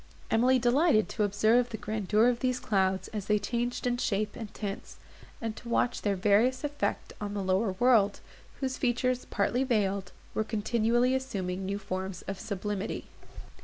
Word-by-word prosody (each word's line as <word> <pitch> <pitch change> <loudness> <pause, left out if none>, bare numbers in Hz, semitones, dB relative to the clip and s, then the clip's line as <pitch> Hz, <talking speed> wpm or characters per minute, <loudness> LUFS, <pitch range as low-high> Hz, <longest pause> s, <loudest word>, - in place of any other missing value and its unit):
Emily 250 +3 +4
delighted 250 -1 +3
to 220 - -3
observe 215 +4 +3
the 220 - -5
grandeur 215 +1 +1
of 245 -1 +1
these 255 0 0
clouds 190 -2 +1
as 210 -3 -5
they 210 - +4
changed 240 +4 -2
in 245 0 +1
shape 210 -3 -1
and 220 -3 -7
tints, 200 -1 -6 0.4
and 225 -2 -3
to 235 - -10
watch 245 +1 +1
their 205 -2 +1
various 215 +7 +3
effect 290 0 -2
on 205 0 -3
the 200 - -2
lower 190 +2 +1
world, 215 -2 +3 0.4
whose 260 -1 -1
features, 250 0 0
partly 240 +6 0
veiled, 200 -6 0 0.2
were 220 - 0
continually 230 +3 +1
assuming 190 -8 -2
new 200 +1 -1
forms 190 -2 -5
of 195 -1 -5
sublimity. 200 -1 -4
215 Hz, 165 wpm, -29 LUFS, 200-245 Hz, 0.4 s, Emily